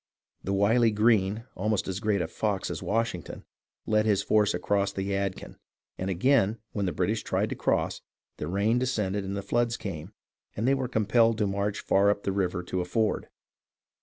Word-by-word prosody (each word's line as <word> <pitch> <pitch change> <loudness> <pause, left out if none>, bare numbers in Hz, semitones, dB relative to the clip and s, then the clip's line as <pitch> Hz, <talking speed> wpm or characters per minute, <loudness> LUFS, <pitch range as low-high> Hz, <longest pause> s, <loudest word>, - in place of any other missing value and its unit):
The 95 - -2
wily 110 +4 +4
Greene, 105 0 +2
almost 105 +1 -1
as 95 0 -3
great 105 -4 +1
a - - -3
"fox" 100 +2 -2
as - - -5
Washington, 115 -6 -2 0.4
led 110 0 +2
his 100 -2 +2
force 105 -3 +3
across 100 +2 0
the 95 -1 -3
Yadkin, 100 -1 -3 0.4
and 95 - -3
again 110 +2 +2
when 100 -2 -1
the - - 0
British - - 0
tried - - -1
to - - -2
cross, - - 0 0.4
the 75 - -4
rain 100 +6 +1
descended 105 -6 -1
and 100 +1 -4
the 100 - -4
floods 120 +3 0
came, 90 -3 -6 0.5
and 110 +4 0
they 135 - +4
were 135 -2 -1
compelled 115 0 +3
to 105 - +1
march 100 +1 -1
far 100 +1 +3
up 100 0 0
the 100 - 0
river 90 -2 -1
to 90 +1 -2
a - - -3
ford. 110 +4 0
100 Hz, 190 wpm, -27 LUFS, 95-110 Hz, 0.5 s, wily